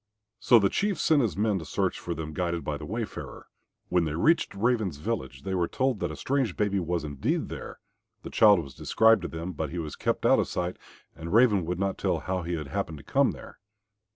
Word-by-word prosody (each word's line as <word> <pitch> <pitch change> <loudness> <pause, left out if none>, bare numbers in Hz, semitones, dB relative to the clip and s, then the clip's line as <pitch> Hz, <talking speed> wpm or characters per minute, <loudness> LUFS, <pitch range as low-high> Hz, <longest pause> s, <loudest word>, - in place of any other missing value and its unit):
So 120 - +6
the 100 -3 +4
Chief 200 - 0
sent 155 -3 +4
his 105 -8 -1
men 105 -2 +1
to 80 - -8
search - - -1
for - - -4
them 80 0 -6
guided 85 0 -2
by 75 - -2
the 75 0 -8
wayfarer. 110 +2 -5 0.4
When 90 -2 +2
they 80 -1 -3
reached 155 - +2
Raven's 110 - 0
village 70 - -4
they 95 - -3
were 90 -2 +1
told 130 -4 0
that 85 - -1
a 75 - -6
strange 130 - -1
baby 100 -2 +1
was 85 -1 -2
indeed 70 -3 -2
there; - - -7 0.5
the - - -7
child 105 -6 +6
was 70 -2 -11
described 110 -2 +3
to 90 - -3
them, 80 +3 -5
but 80 -2 -4
he 90 - -6
was 80 -3 -4
kept - - -1
out - - +5
of - - +1
sight, 90 0 -3 0.4
and 85 +1 -7
Raven 105 -5 +4
would 90 0 -2
not 100 +1 -1
tell - - +1
how 95 0 -2
he 85 +1 -3
had 75 -4 -5
happened 80 +2 -3
to 70 - -12
come - - +2
there. - - -9
90 Hz, 230 wpm, -27 LUFS, 80-110 Hz, 0.5 s, So